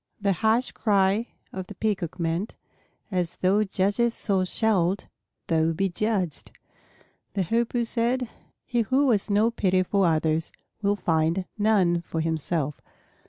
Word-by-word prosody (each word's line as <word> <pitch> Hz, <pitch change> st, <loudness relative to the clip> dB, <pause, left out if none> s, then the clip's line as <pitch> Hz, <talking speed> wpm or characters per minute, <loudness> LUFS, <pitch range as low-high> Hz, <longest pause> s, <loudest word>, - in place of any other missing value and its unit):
The 200 Hz, -2 st, +2 dB
harsh 220 Hz, +7 st, +1 dB
cry 200 Hz, +1 st, +2 dB, 0.3 s
of 185 Hz, -1 st, -5 dB
the 205 Hz, -, -9 dB
Peacock 190 Hz, -5 st, -2 dB
meant, 170 Hz, +5 st, -1 dB, 0.6 s
"As 180 Hz, -3 st, -1 dB
thou 195 Hz, +3 st, +2 dB
judgest 205 Hz, +4 st, +1 dB
so 195 Hz, -3 st, +1 dB
shalt 190 Hz, -2 st, +1 dB, 0.4 s
thou 165 Hz, 0 st, +2 dB
be 195 Hz, +4 st, 0 dB
judged." 190 Hz, -4 st, -2 dB, 0.8 s
The 195 Hz, -, +1 dB
Hoopoe 235 Hz, +5 st, 0 dB
said, 240 Hz, +2 st, 0 dB, 0.4 s
"He 240 Hz, -2 st, +1 dB
who 260 Hz, +4 st, +2 dB
has 205 Hz, -2 st, +1 dB
no 210 Hz, +3 st, +3 dB
pity 185 Hz, -4 st, +2 dB
for 195 Hz, 0 st, +2 dB
others 160 Hz, 0 st, +1 dB, 0.3 s
will 200 Hz, 0 st, +2 dB
find 165 Hz, 0 st, +1 dB
none 200 Hz, -5 st, +3 dB
for 165 Hz, -1 st, -4 dB
himself." 160 Hz, -2 st, -1 dB
195 Hz, 135 wpm, -26 LUFS, 170-220 Hz, 0.8 s, no